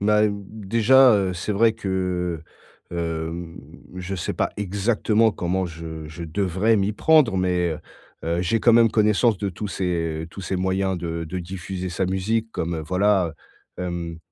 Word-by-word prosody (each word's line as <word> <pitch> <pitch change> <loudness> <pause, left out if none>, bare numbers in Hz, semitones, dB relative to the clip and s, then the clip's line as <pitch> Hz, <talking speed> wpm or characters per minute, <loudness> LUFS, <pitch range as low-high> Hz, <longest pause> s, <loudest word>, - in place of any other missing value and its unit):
Bah, 105 +1 +3
d - - +2 0.4
déjà, 125 +3 +6
heu, 95 -2 +1
c'est 90 +4 -3
vrai 110 +3 +4
que, 90 -5 -2 0.5
hem, 85 0 -4 0.4
je 90 +1 -4
sais 90 - -3
pas - - 0
exactement 105 +2 +1
comment 90 +1 -1
je 80 -2 -7
je 75 +3 -8
devrais 95 +6 +1
m'y 100 +1 +1
prendre, 145 -3 +4
mais 90 -3 +1 0.5
heu, 85 +1 0
j'ai 110 +5 +1
quand 120 - +5
même 115 -2 +6
connaissance 105 0 +3
de 100 - -2
tous 100 +3 -5
ces 85 -4 -2
tous 100 - -9
ces 95 - -2
moyens 95 0 0
de 85 -1 -4
de 90 +4 -5
diffuser 95 +1 -5
sa 90 +2 -1
musique 110 +4 -1
comme, 85 +1 -2
heu, - - -3
voilà, 95 0 +2 0.5
hem, 85 -2 -4
95 Hz, 165 wpm, -23 LUFS, 85-105 Hz, 0.5 s, déjà